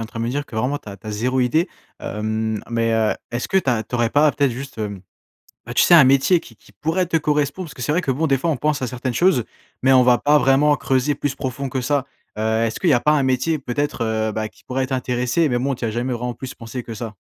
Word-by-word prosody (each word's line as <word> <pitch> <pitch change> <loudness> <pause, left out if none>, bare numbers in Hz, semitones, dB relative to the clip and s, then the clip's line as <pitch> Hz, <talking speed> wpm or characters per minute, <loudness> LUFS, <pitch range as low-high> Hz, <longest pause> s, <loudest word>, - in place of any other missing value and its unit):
en 115 - -5
train 115 0 -7
de 115 - -1
me 120 - -1
dire 145 +2 -3
que, 110 - -9
vraiment, 130 +6 0
tu - - -13
as 100 - -8
tu 100 - -16
as 110 - -4
0 125 +5 -1
idée. 155 +9 +2 0.3
Hem, 110 0 -2
mais, 115 -1 +1
heu, 110 -1 +2 0.2
est-ce 120 +1 -3
que 190 - +2
tu 160 - -3
as 115 -3 +2
tu 110 - -8
aurais 120 -1 +2
pas 145 +4 +4
peut-être 140 -2 +1
juste, 135 +1 -8
hem, 100 -3 -4 0.6
bah, - - -6
tu - - +5
sais, 175 - +6
un 160 -5 +9
métier 135 +7 +4
qui 120 - -14
qui 105 - -22
pourrait 160 - -1
te 165 - 0
correspondre? 150 +3 0
Parce 155 - -11
que 125 - -8
c'est 120 - -1
vrai 165 +4 +2
que, 135 -7 -1
bon, 160 +5 0
des 135 -1 +3
fois 165 +6 0
on 155 - 0
pense 150 +3 0
à 130 - -1
certaines 125 +1 -3
choses, 175 -6 +3 0.4
mais 135 +1 +4
on 130 -1 +6
va 125 -1 +5
pas 150 +1 +4
vraiment 140 +3 +4
creuser 135 +1 0
plus 145 -2 -2
profond 135 0 -4
que 130 0 -2
ça. 135 +1 0 0.3
Heu, 110 +1 +1
est-ce 115 - -2
que 185 - -2
il - - +5
y - - +6
a 120 - +4
pas 150 - +2
un 140 -3 +2
métier 130 +5 +1
peut-être, 140 0 -2
heu, 110 -1 0
bah, 110 0 -3
qui - - -24
pourrait 130 0 -2
t'intéresser, 125 +4 0
mais 120 -1 0
bon, 135 +2 -1
tu 120 - -6
y - - 0
as - - -2
jamais 120 +3 -2
vraiment 120 0 -3
plus 130 -2 -8
pensé 115 +2 -7
que 115 - -7
ça? 110 0 -6
130 Hz, 295 wpm, -21 LUFS, 115-145 Hz, 0.6 s, un